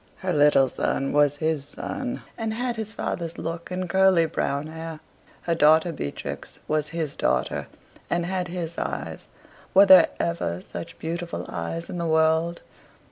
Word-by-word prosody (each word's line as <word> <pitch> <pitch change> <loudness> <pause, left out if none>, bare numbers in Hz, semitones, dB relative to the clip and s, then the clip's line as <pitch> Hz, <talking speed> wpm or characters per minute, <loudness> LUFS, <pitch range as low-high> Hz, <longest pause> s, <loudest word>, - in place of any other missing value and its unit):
Her 185 -1 -1
little 145 -3 +5
son 135 +2 -1
was 145 -1 +4
his 155 -1 -1
son, 250 - -5
and 225 -1 -3
had 245 0 -1
his 220 -1 -5
father's 170 -6 -4
look 165 +1 -5
and 185 0 -3
curly 190 -1 +4
brown 140 -2 -1
hair. 160 0 -7 0.4
Her 170 - +1
daughter 160 +2 +5
Beatrix 70 - -6
was 155 -1 0
his 160 -2 -3
daughter, - - 0 0.4
and 175 0 0
had 180 0 -2
his 170 -2 -4
eyes - - -4 0.5
were 195 +1 +9
there 185 -3 +9
ever 170 - -1
such 165 - -8
beautiful 170 +1 -4
eyes 85 0 -4
in 175 - -5
the 170 - -1
world? 160 +1 +2
165 Hz, 155 wpm, -25 LUFS, 155-180 Hz, 0.5 s, were